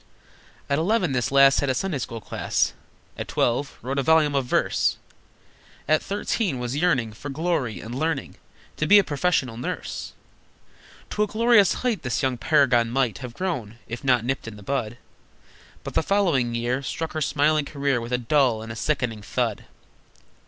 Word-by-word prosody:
At 140 +1 +1
eleven 185 -1 +1
this 125 -2 0
lass 140 0 +6
Had 140 - -1
a 130 - +1
Sunday 175 -2 -2
school 115 -2 -5
class, - - -1 0.5
At - - -4
twelve 140 +4 0
wrote 135 +3 -2
a - - +2
volume 155 +1 +4
of 135 -2 +1
verse, - - +1 0.9
At 155 0 +3
thirteen 200 - -1
was 125 +1 -3
yearning 140 -9 +1
For 140 +6 -8
glory, 135 - -1
and 110 +6 -8
learning 150 +1 -2 0.4
To 155 - 0
be 205 - +8
a 200 - +6
professional 145 -7 0
nurse. 125 - -5 1.0
To 210 - -1
a 210 - +3
glorious 225 -2 +4
height 235 -5 +1
The 125 -2 -2
young 130 -3 -1
paragon 125 -4 +3
might 120 -6 0
Have 125 -2 -8
grown, 125 - -3
if 120 +1 -6
not 125 -4 +2
nipped 135 -2 -2
in 115 - -7
the 105 - -12
bud, 120 -2 -2 0.9
But - - -6
the - - +2
following 160 -12 +1
year 120 +3 -1
Struck 160 +4 -4
her 155 - -3
smiling 150 +1 +2
career 140 -4 -1
With 115 +1 -7
a 125 - +2
dull 125 -2 +2
and 115 - -7
a - - -6
sickening 120 -4 -1
thud! - - -2
135 Hz, 175 wpm, -24 LUFS, 120-155 Hz, 1.0 s, be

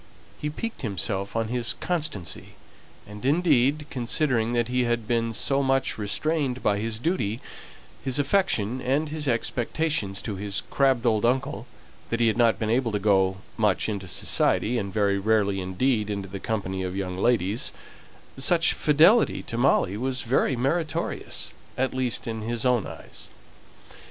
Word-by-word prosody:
He 150 - -2
piqued 230 +9 -5
himself 100 - -3
on 115 -1 0
his 120 -1 -1
constancy; 150 - -3 0.5
and 105 +2 -11
indeed, 145 -1 +3
considering 120 -2 0
that 120 -1 +1
he 125 0 +1
had 120 -2 -1
been 115 0 +1
so 135 +5 +1
much 135 -3 +1
restrained 130 +4 -1
by 100 -1 +2
his 110 0 -3
duty, 120 - -1 0.6
his 130 0 0
affection, 135 - +1
and 145 +4 0
his 150 -1 -4
expectations 120 -2 -1
to 105 -2 -4
his 100 0 -1
crabbed 135 -3 +2
old 110 -3 +2
uncle, 130 +1 0 0.4
that 115 - -1
he 120 - +3
had 110 0 +2
not 115 -2 +4
been 110 -1 -1
able 120 -1 +1
to - - +2
go 95 -2 +2 0.2
much 105 -4 +2
into 100 -3 -4
society, 115 +7 +1
and 100 -2 -4
very 100 -1 +1
rarely 100 -2 +1
indeed 105 +4 0
into 100 -2 -3
the 100 +1 -7
company 95 -4 -3
of 95 0 -3
young 95 -2 -3
ladies, 110 -1 +2 0.7
such 165 +5 +4
fidelity 165 +10 +4
to - - -5
Molly 115 -5 +2
was 130 +2 -2
very 130 +2 +1
meritorious, 160 +6 -2 0.2
at 130 0 0
least 130 -2 0
in 110 -1 -4
his 115 +1 -3
own 125 -4 +2
eyes. - - -9
120 Hz, 155 wpm, -26 LUFS, 105-135 Hz, 0.7 s, not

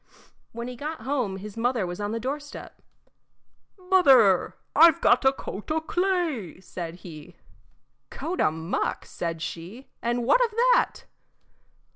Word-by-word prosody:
When 235 +1 -6
he 250 - -6
got 300 +4 -6
home 245 -6 -2
his 200 +1 -9
mother 235 -2 0
was 175 +3 -6
on 205 0 -2
the 230 - -2
doorstep. 290 +4 -6 1.0
"Mother, 275 - +4 0.2
I 330 +3 +9
've 320 - -3
got - - +4
a 265 - +7
coat 210 -6 -8
o' 315 +1 +1
clay," 330 - -1
said 170 -2 -7
he. 165 0 -11 0.7
"Coat 360 +3 -4
o' - - +4
muck," 160 +3 -3
said 165 -2 -5
she; 175 +9 -8
"and 240 +1 -1
what - - +4
of 475 - +1 0.2
that?" - - 0
235 Hz, 145 wpm, -26 LUFS, 185-300 Hz, 1.0 s, I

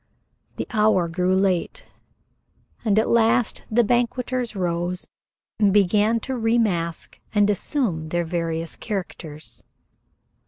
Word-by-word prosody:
The - - -3
hour 210 -5 +3
grew 180 +2 +1
late, 190 - 0 1.0
and 215 -3 +2
at 220 - +3
last 230 0 +2
the 235 +2 +3
banqueters 245 +1 0
rose 175 0 -2 0.5
and 205 -2 +4
began 210 +3 +3
to 265 - -4
remask 220 -9 0 0.2
and 205 -1 +5
assume 190 - -1
their 175 +1 0
various 165 -1 -2
characters. 160 - -6
200 Hz, 110 wpm, -23 LUFS, 175-225 Hz, 1.0 s, and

